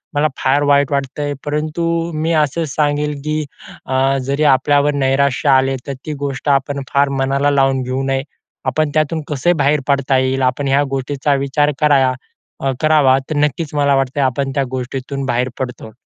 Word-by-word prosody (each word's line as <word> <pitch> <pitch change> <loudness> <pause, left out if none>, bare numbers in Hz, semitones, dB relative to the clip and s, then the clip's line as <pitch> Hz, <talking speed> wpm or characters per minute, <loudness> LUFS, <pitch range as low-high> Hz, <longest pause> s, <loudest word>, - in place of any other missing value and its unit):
मला 145 +1 +3
फार 140 +2 +2
वाईट 145 -1 +3
वाटतंय, 140 +1 -2
परंतु 150 +3 -2 0.3
मी 155 +2 -1
असं 155 +1 +1
सांगेन 150 +1 0
की 155 0 -1 0.4
अ, 135 +1 +1
जरी 140 +2 0
आपल्यावर 145 +2 +2
नैराश्य 140 +2 +1
आले 135 0 +3
तर, 140 - -3
ती 155 - -3
गोष्ट 140 +1 -3
आपण 140 +1 -5
फार 140 0 +3
मनाला 140 +2 +1
लावून 135 -1 +2
घेऊ 130 +2 -2
नये. 135 0 -1 0.4
आपण 155 -1 0
त्यातून 155 +1 0
कसे 150 +4 +1
बाहेर 145 +2 +3
पडता 140 -1 +2
येईल? 130 +1 0
आपण 130 +2 0
ह्या 135 +1 +3
गोष्टीचा 135 +1 -1
विचार 140 +2 +1
कराया 140 -4 +3 0.7
करावा. 150 -4 +4
तर 155 - -2
नक्कीच 150 +1 -1
मला 140 -1 +3
वाटत 135 0 -1
आपण 135 0 0
त्या 140 - +2
गोष्टीतून 130 +2 -4
बाहेर 125 0 0
पडतो. 125 -3 -5
140 Hz, 165 wpm, -17 LUFS, 135-150 Hz, 0.7 s, करावा